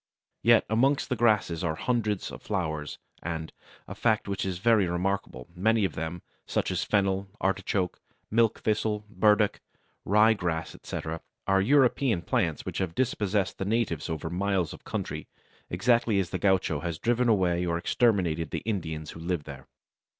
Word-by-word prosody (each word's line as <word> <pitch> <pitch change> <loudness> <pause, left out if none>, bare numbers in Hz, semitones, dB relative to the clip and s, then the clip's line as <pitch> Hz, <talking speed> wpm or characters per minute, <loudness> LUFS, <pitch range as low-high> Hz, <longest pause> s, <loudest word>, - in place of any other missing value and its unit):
Yet 115 -1 +5
amongst 135 +7 +2
the 125 - +1
grasses 105 -7 +2
are 80 -2 0
hundreds 110 0 -1
of - - -9
flowers, 80 -7 -3 0.2
and, 80 -1 -4 0.3
a - - -6
fact 110 -3 +1
which 100 -1 -2
is 90 -2 -2
very 105 -1 +3
remarkable, 85 -7 -2
many 110 +3 +2
of - - -2
them, 80 +2 -5 0.2
such - - 0
as - - 0
Fennel, 95 -1 +1
Artichoke, 95 -1 -1 0.3
Milk 115 0 +2
Thistle, 105 -1 0
Burdock, 105 -1 +3 0.4
Rye 105 +3 +5
Grass, 85 -5 -3
etc., 80 +1 -5 0.2
are 95 0 +3
European 125 -4 +3
plants 80 -2 0
which - - -4
have 95 -3 -2
dispossessed 105 -6 0
the - - -1
natives 100 -7 -1
over 80 0 -3
miles 95 -2 0
of - - -12
country, - - -4 0.4
exactly 115 +3 +2
as 90 -3 -2
the - - -2
gaucho 95 -6 +2
has 85 0 -3
driven 120 +5 +1
away 90 -5 +2
or 85 -1 0
exterminated 85 -6 +1
the - - -4
Indians 80 -8 -3
who - - -10
lived 85 -2 -2
there. 70 -3 -10
95 Hz, 160 wpm, -28 LUFS, 85-110 Hz, 0.4 s, Yet